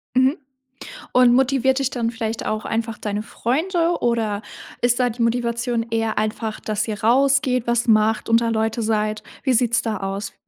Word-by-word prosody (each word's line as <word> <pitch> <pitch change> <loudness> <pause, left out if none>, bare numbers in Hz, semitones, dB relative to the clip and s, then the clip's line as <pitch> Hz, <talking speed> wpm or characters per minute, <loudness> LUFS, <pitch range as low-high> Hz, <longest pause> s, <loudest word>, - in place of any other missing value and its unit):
Mhm. 260 +4 +3 0.8
Und, 250 -1 +6
motiviert 265 +1 +2
dich 270 -1 0
dann 230 -2 -2
vielleicht 225 -1 -4
auch 215 0 -2
einfach 225 -1 -2
deine 210 0 -3
Freunde 335 - 0
oder 220 -3 0 0.4
ist 245 +1 +2
da 245 -1 +3
die 235 +1 -6
Motivation 235 0 0
eher 225 -1 -1
einfach, 215 0 -2
dass 215 +1 -2
ihr 210 -1 -4
rausgeht, 255 0 +3
was 235 0 0
macht, 220 0 +2
unter 230 0 +3
Leute 220 +1 -1
seid? 215 -1 -1 0.2
Wie 260 -2 +2
sieht's 235 0 +2
da 220 -3 -2
aus? 195 +1 -4
230 Hz, 165 wpm, -21 LUFS, 220-250 Hz, 0.8 s, Und